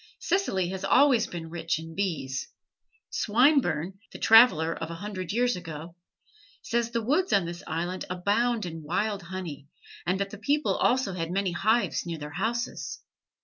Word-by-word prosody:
Sicily 265 - 0
has 190 +1 -5
always 260 -5 +4
been 165 -2 -7
rich 165 -1 -1
in 160 0 -8
bees. 160 -9 -2 0.6
Swinburne 205 - +2
(the - - -8
traveler 220 -8 +6
of 160 - -5
a 170 - -5
hundred 185 -1 -5
years 245 +3 +2
ago) 165 -1 -8 0.7
says 235 0 0
the 235 -1 -2
woods 320 - +1
on 195 -3 +3
this 170 +1 -6
island 175 +3 -3
abounded 205 +2 0
in 165 - -7
wild 200 +6 -1
honey, 170 -6 -7 0.4
and 185 +2 +1
that 200 0 -2
the 215 - -9
people 290 +7 +1
also 250 -6 +2
had 165 -2 -3
many 190 +1 0
hives 220 +6 +1
near 170 -1 -4
their 150 -1 -7
houses. 230 - -3
190 Hz, 160 wpm, -27 LUFS, 165-230 Hz, 0.7 s, traveler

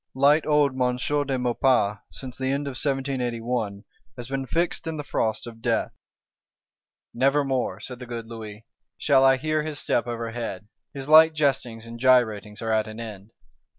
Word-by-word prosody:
Light 145 +4 +4
old 150 -2 +4
M. 125 -1 0
de 145 0 0
Maurepas, 120 -4 +2
since 130 -2 -7
the 130 - -3
end 140 +1 -1
of 140 - -3
1781, 125 -6 -2 0.3
has 120 -1 -6
been 135 0 -3
fixed 170 +1 -1
in 160 -1 -3
the 150 - -4
frost 110 -5 -1
of 115 -1 -10
death: - - 0 1.2
'Never 135 +4 +2
more,' 125 -8 -1
said 125 +3 -8
the 125 - -9
good 115 -1 -5
Louis, 110 -1 -9 0.3
'shall 135 -3 +4
I 135 0 +6
hear 155 +3 0
his 150 -1 -5
step 120 - 0
overhead;' 115 -4 -5 0.2
his 135 -1 -6
light 160 +1 +7
jestings 130 -6 0
and 115 0 -9
gyratings 110 -5 +2
are 110 - -1
at 110 -1 +1
an 110 +1 -8
end. 105 -3 -8
125 Hz, 170 wpm, -25 LUFS, 115-140 Hz, 1.2 s, light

